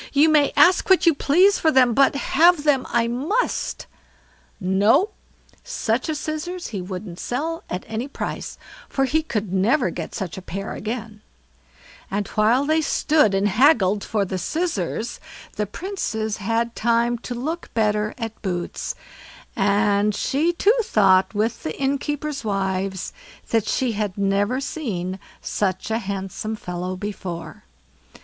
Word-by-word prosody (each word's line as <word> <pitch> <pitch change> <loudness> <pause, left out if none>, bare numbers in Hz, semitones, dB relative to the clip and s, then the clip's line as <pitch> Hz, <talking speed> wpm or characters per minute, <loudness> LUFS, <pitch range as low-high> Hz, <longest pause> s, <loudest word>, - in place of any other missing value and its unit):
"You 295 +3 +5
may 300 -2 +4
ask 350 +7 +5
what 380 -1 +5
you 335 - +6
please 360 +8 +4
for 320 - +3
them, 255 -4 +4
but 275 +3 +4
have 320 +3 +4
them 285 -4 +2
I 235 -1 +2
must." 295 - -1 0.7
No! 205 - +3 0.5
Such 250 - -1
a - - -4
pair 315 - 0
of - - -4
scissors 310 +4 -4
he 200 -5 -4
wouldn't 180 -1 -7
sell 325 +7 -3
at 180 - -3
any 225 +4 -3
price, 280 - -5 0.3
for 270 - +1
he 310 +5 +1
could 210 - -3
never 235 +9 +2
get - - -6
such 190 -3 -4
a - - -11
pair 195 +2 -5
again; 220 -1 -5 0.9
and 200 0 -2
while 230 +6 +3
they 315 +2 +2
stood 295 -8 +2
and 195 +1 +2
haggled 210 - +4
for 210 -3 0
the 185 0 -3
scissors, 235 - -2 0.4
the 210 - -1
Princess 220 - -3
had 230 +3 -1
time 235 +1 +1
to 245 +1 -6
look 315 +8 -4
better 210 -1 +1
at 225 -2 -6
Boots, 175 -4 -3 0.6
and 205 0 +2
she 300 +10 +1
too 395 +5 +3
thought 190 - +3
with 220 +2 0
the 155 - -5
innkeepers' 280 +1 -2
wives 190 -2 -2 0.4
that 225 -2 +2
she 255 +1 +1
had 210 -3 -3
never 200 +5 +1
seen 195 - -4 0.2
such 190 +1 -2
a 225 - +1
handsome 200 +1 -4
fellow 180 -2 -4
before. 185 -4 -6
225 Hz, 150 wpm, -23 LUFS, 195-285 Hz, 0.9 s, you